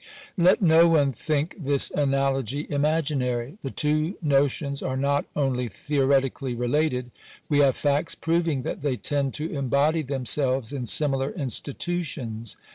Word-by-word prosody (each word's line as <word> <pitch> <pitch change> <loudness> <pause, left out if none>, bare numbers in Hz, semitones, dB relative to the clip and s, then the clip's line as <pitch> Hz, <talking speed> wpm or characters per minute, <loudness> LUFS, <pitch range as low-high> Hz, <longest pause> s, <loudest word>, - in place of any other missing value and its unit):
Let 180 +2 +4
no 165 0 +6
one 145 -4 +3
think 150 +6 -2
this 140 -3 +2
analogy 135 -1 0
imaginary. 145 - -1
The 135 - -4
two 155 +6 0
notions 140 -2 +1
are 130 0 -2
not 140 +1 0
only 130 -4 0
theoretically 135 +1 0
related; 125 0 -1 0.4
we 145 -2 +2
have 140 -3 +4
facts 145 +2 +1
proving 165 -5 0
that - - -4
they 140 -3 -1
tend 140 0 -1
to 155 +2 -3
embody 140 +3 +1
themselves 135 -2 0
in 125 -4 -4
similar 135 0 +1
institutions. 135 - -4
140 Hz, 130 wpm, -25 LUFS, 130-150 Hz, 0.4 s, no